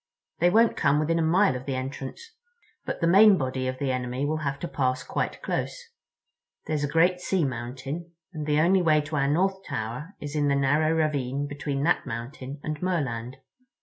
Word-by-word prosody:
They 175 Hz, -, +5 dB
won't 225 Hz, +4 st, +4 dB
come 140 Hz, +2 st, +2 dB
within 165 Hz, +2 st, +1 dB
a -, -, +2 dB
mile 175 Hz, +1 st, +3 dB
of 125 Hz, +2 st, -7 dB
the 135 Hz, -, -1 dB
entrance. 135 Hz, -, -6 dB, 0.5 s
But -, -, -4 dB
the 165 Hz, -, +3 dB
main 200 Hz, +3 st, +7 dB
body 130 Hz, -2 st, -2 dB
of 130 Hz, 0 st, -3 dB
the 135 Hz, -1 st, -1 dB
enemy 125 Hz, +1 st, -2 dB
will 155 Hz, +2 st, 0 dB
have 140 Hz, -3 st, -2 dB
to 175 Hz, -, -2 dB
pass 130 Hz, -4 st, -1 dB
quite -, -, -3 dB
close. -, -, -2 dB, 0.9 s
There's 150 Hz, -2 st, -1 dB
a -, -, +1 dB
great 175 Hz, +4 st, +3 dB
sea 180 Hz, -2 st, 0 dB
mountain, 135 Hz, +6 st, -5 dB, 0.2 s
and 155 Hz, -2 st, -5 dB
the 150 Hz, 0 st, +2 dB
only 185 Hz, +3 st, +4 dB
way 155 Hz, -3 st, +4 dB
to 150 Hz, +1 st, -5 dB
our 140 Hz, -1 st, +2 dB
North 190 Hz, +6 st, +1 dB
Tower 135 Hz, -, -5 dB
is 145 Hz, 0 st, -6 dB
in 145 Hz, -1 st, +2 dB
the 140 Hz, -, +2 dB
narrow 145 Hz, +3 st, +2 dB
ravine 145 Hz, -4 st, 0 dB
between 145 Hz, -1 st, -3 dB
that 165 Hz, -, +1 dB
mountain 130 Hz, +4 st, -6 dB
and 155 Hz, -1 st, -4 dB
Merland." 130 Hz, -9 st, -2 dB
145 Hz, 195 wpm, -26 LUFS, 130-165 Hz, 0.9 s, main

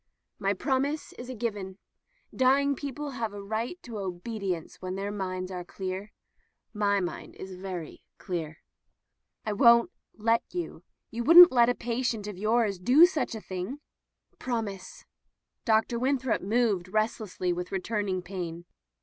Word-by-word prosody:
"My 200 Hz, 0 st, +1 dB
promise 280 Hz, +6 st, -1 dB
is 245 Hz, +1 st, -9 dB
given. 205 Hz, -4 st, -3 dB, 0.6 s
Dying 275 Hz, +2 st, +4 dB
people 285 Hz, +1 st, -5 dB
have 230 Hz, -5 st, -3 dB
a 200 Hz, -1 st, -7 dB
right 220 Hz, -, -3 dB
to 230 Hz, -4 st, -6 dB
obedience 190 Hz, -1 st, -4 dB
when 185 Hz, 0 st, -4 dB
their 200 Hz, +1 st, -3 dB
minds 185 Hz, -2 st, -4 dB
are 180 Hz, -1 st, -4 dB
clear. 190 Hz, +3 st, -5 dB, 0.6 s
Mine 200 Hz, -4 st, -1 dB
is 190 Hz, 0 st, -8 dB
very 180 Hz, -3 st, -7 dB
clear." 160 Hz, -4 st, -5 dB, 0.8 s
"I 215 Hz, -, -1 dB
won't 235 Hz, -, +6 dB, 0.3 s
let 230 Hz, +2 st, +2 dB
you. 350 Hz, -1 st, -4 dB, 0.3 s
You 235 Hz, +1 st, -3 dB
wouldn't 345 Hz, +6 st, +10 dB
let 240 Hz, -2 st, +5 dB
a 245 Hz, -, +1 dB
pa 235 Hz, +1 st, -2 dB
tient 225 Hz, -5 st, -1 dB
of 210 Hz, -, -5 dB
yours 215 Hz, -2 st, +1 dB
do 260 Hz, -, +7 dB
such 330 Hz, -9 st, -1 dB
a 220 Hz, -, -6 dB
thing." 190 Hz, +10 st, -5 dB, 0.6 s
"Promise." 220 Hz, -6 st, -4 dB, 0.6 s
Dr. 225 Hz, +1 st, +2 dB
Winthrop 260 Hz, -1 st, +1 dB
moved 205 Hz, -3 st, +1 dB
rest 215 Hz, +3 st, 0 dB
lessly 185 Hz, -4 st, -2 dB
with 180 Hz, +1 st, -5 dB
returning 195 Hz, -1 st, -1 dB
pain. 175 Hz, -2 st, -6 dB
215 Hz, 140 wpm, -28 LUFS, 185-240 Hz, 0.8 s, wouldn't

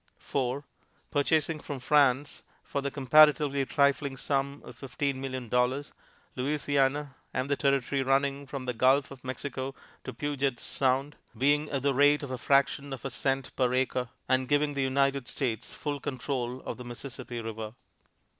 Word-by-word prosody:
4. 135 Hz, +1 st, -2 dB, 0.5 s
Purchasing 155 Hz, +2 st, +2 dB
from 145 Hz, -1 st, -5 dB
France, 140 Hz, 0 st, +3 dB, 0.2 s
for 140 Hz, -, -3 dB
the 140 Hz, -, -1 dB
comparatively 140 Hz, 0 st, +5 dB
trifling 140 Hz, -1 st, +2 dB
sum 140 Hz, +1 st, -1 dB
of -, -, -10 dB
fifteen 135 Hz, 0 st, -3 dB
million 130 Hz, -2 st, -4 dB
dollars, 125 Hz, +4 st, 0 dB, 0.4 s
Louisiana 140 Hz, +1 st, 0 dB, 0.2 s
and 130 Hz, +2 st, -1 dB
the -, -, +4 dB
territory 140 Hz, -1 st, +1 dB
running 135 Hz, +1 st, +1 dB
from 135 Hz, -1 st, -5 dB
the 125 Hz, -, -1 dB
Gulf 130 Hz, +4 st, +3 dB
of 135 Hz, -2 st, -11 dB
Mexico 130 Hz, +1 st, -4 dB, 0.3 s
to -, -, -5 dB
Puget's 140 Hz, -4 st, -2 dB
Sound, 135 Hz, +2 st, 0 dB, 0.2 s
being 145 Hz, +4 st, +2 dB
at 135 Hz, -2 st, -2 dB
the 140 Hz, -1 st, +3 dB
rate 145 Hz, +2 st, +4 dB
of 140 Hz, -, -5 dB
a 130 Hz, -, -4 dB
fraction 140 Hz, +1 st, +2 dB
of 130 Hz, -2 st, -8 dB
a 135 Hz, -, -2 dB
cent 135 Hz, 0 st, -1 dB
per 125 Hz, -2 st, +2 dB
acre, 130 Hz, -1 st, 0 dB, 0.2 s
and 130 Hz, 0 st, +2 dB
giving 145 Hz, 0 st, +2 dB
the 140 Hz, -, -1 dB
United 135 Hz, -1 st, +1 dB
States 120 Hz, -6 st, -3 dB
full 145 Hz, -1 st, -4 dB
control 130 Hz, -2 st, -3 dB
of -, -, -4 dB
the 125 Hz, -, -8 dB
Mississippi 120 Hz, 0 st, -7 dB
River. 110 Hz, -1 st, -6 dB
135 Hz, 160 wpm, -29 LUFS, 130-145 Hz, 0.5 s, comparatively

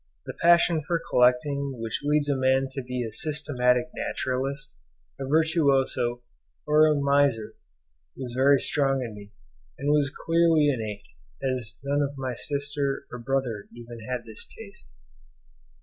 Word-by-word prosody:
The -, -, -6 dB
passion 170 Hz, -1 st, +5 dB
for 170 Hz, +3 st, -1 dB
collecting 130 Hz, +2 st, +2 dB
which 115 Hz, -1 st, -3 dB
leads 145 Hz, 0 st, +2 dB
a 140 Hz, -, +1 dB
man 130 Hz, 0 st, +2 dB
to 135 Hz, -, -4 dB
be 125 Hz, 0 st, -4 dB
a 110 Hz, -2 st, -6 dB
systematic 125 Hz, -4 st, 0 dB
naturalist, 135 Hz, -, -3 dB, 0.4 s
a 135 Hz, -, -4 dB
virtuoso, 140 Hz, -6 st, +2 dB, 0.4 s
or 155 Hz, +1 st, +5 dB
a 155 Hz, -, +3 dB
miser, 140 Hz, -6 st, +2 dB, 0.6 s
was 125 Hz, -3 st, -6 dB
very 135 Hz, +3 st, +5 dB
strong 135 Hz, -2 st, +1 dB
in 115 Hz, -3 st, -6 dB
me, 105 Hz, 0 st, -12 dB, 0.5 s
and 145 Hz, -, 0 dB
was 145 Hz, -2 st, +2 dB
clearly 165 Hz, -2 st, +4 dB
innate, 110 Hz, -6 st, -3 dB, 0.4 s
as 125 Hz, -3 st, -2 dB
none 140 Hz, +1 st, 0 dB
of 140 Hz, 0 st, -2 dB
my 130 Hz, -2 st, -3 dB
sisters 140 Hz, +1 st, -2 dB
or 125 Hz, -, -6 dB
brother 125 Hz, -4 st, -2 dB
ever 120 Hz, 0 st, -9 dB
had 125 Hz, -2 st, -3 dB
this 110 Hz, -2 st, -7 dB
taste. 200 Hz, -3 st, -12 dB
135 Hz, 145 wpm, -26 LUFS, 125-145 Hz, 0.6 s, passion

